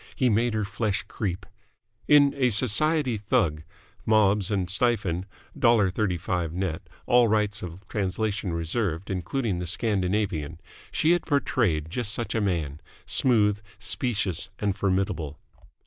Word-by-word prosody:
He 125 -2 +2
made 115 +2 +1
her 105 -1 0
flesh 105 0 -1
creep. 95 -2 -4 0.6
In 145 -1 +6
"A 130 -3 +2
Society 130 +4 +3
Thug" 100 - 0 0.4
(Mobbs 105 -3 +3
and 95 -4 -1
Stifien, 95 -3 0 0.3
$1.35 95 -7 +1
net, 90 -3 -3 0.2
all 120 -1 +4
rights 105 0 +1
of 90 +1 -9
translation 100 -1 -2
reserved, 85 +2 -2
including 95 +2 -2
the 90 - -4
Scandinavian) 95 -5 -1 0.3
she 160 - +2
had 175 0 +1
portrayed 100 - 0
just 115 0 -1
such 120 - -3
a 115 - 0
man 80 -7 -2 0.2
smooth, 105 -5 +2 0.2
specious, 105 - -1
and 100 -2 -1
formidable. 95 -6 -1
100 Hz, 125 wpm, -26 LUFS, 90-115 Hz, 0.6 s, In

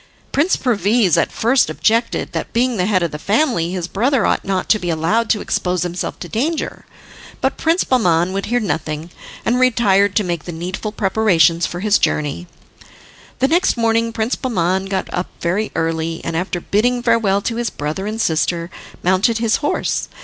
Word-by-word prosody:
Prince 310 +7 +2
Perviz 210 - +2
at 170 - +1
first 245 +4 +2
objected 230 +2 0
that, - - -4
being 245 0 +1
the 180 0 +1
head 185 -4 +2
of 170 - -1
the 150 - -6
family, 210 - +1
his 180 -2 -3
brother 235 +5 +1
ought - - +1
not 190 -1 -2
to 215 - +4
be 175 - -3
allowed 170 +8 +1
to 210 - +2
expose 180 -1 -1
himself 175 0 -4
to 175 - -7
danger; 290 - -3 0.5
but - - 0
Prince 330 +3 +1
Bahman 180 -8 +2
would 195 0 -3
hear 245 +3 +1
nothing, 160 -5 -3 0.3
and 245 +2 +2
retired 205 -6 +3
to 210 - +3
make 170 -4 -3
the 175 - -5
needful 180 +6 -5
preparations 190 -6 +2
for 175 - -6
his 210 0 +3
journey. 150 +4 -1 0.9
The 265 - +2
next 335 -2 +2
morning 230 0 +1
Prince 225 +2 -1
Bahman 190 -6 0
got 195 -1 -2
up 180 0 -2
very 190 +6 -1
early, 165 0 -1
and 165 - -3
after 180 +1 -2
bidding 240 +7 0
farewell 225 -5 +2
to 230 - -2
his 240 -2 -1
brother 155 +7 -4
and 215 +1 -4
sister, 170 -1 0 0.3
mounted 190 +6 +2
his 230 -1 +1
horse. 295 - -1
200 Hz, 180 wpm, -18 LUFS, 175-230 Hz, 0.9 s, to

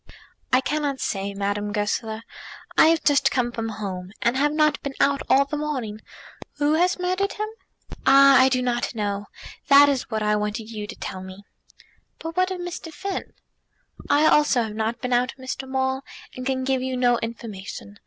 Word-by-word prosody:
"I 255 - +5
cannot 290 -1 -1
say, 200 0 -3
Madame 205 +1 -2
Goesler. 220 +1 -2 0.5
I - - +7
have 330 0 +3
just 285 -2 +4
come 245 -3 0
from 225 -1 -4
home, 190 -4 -6
and 235 +2 +2
have 290 +2 +2
not 305 -1 +2
been 280 -1 -5
out 280 0 +3
all 275 +1 +5
the 300 +2 -4
morning. 260 -8 -3 0.6
Who 295 +1 +1
has 355 +3 +2
murdered 370 +2 -1
him?" 425 +1 -3 0.6
"Ah! 275 0 +7
I 260 - +5
do 255 -1 0
not 245 -1 -1
know. 205 -1 -2 0.4
That 285 +1 +8
is 270 -3 -1
what 220 -2 -2
I 210 0 +2
wanted 210 +2 -3
you 210 -2 -5
to - - -8
tell 185 - -6
me." 190 +2 -10 0.7
"But 325 0 -7
what 370 0 +2
of 375 -1 -4
Mr. 350 -2 -6
Finn?" 380 +5 -5 0.8
"I 295 +2 +4
also 295 -6 +4
have 215 -1 -6
not 225 +2 -2
been 250 0 -1
out, 250 +1 +1
Mr. 260 0 -6
Maule, 265 0 0 0.3
and 255 0 -5
can 260 -1 -1
give 265 -1 0
you 260 0 -2
no 245 -1 +3
information. 205 -3 -7
255 Hz, 185 wpm, -24 LUFS, 215-290 Hz, 0.8 s, That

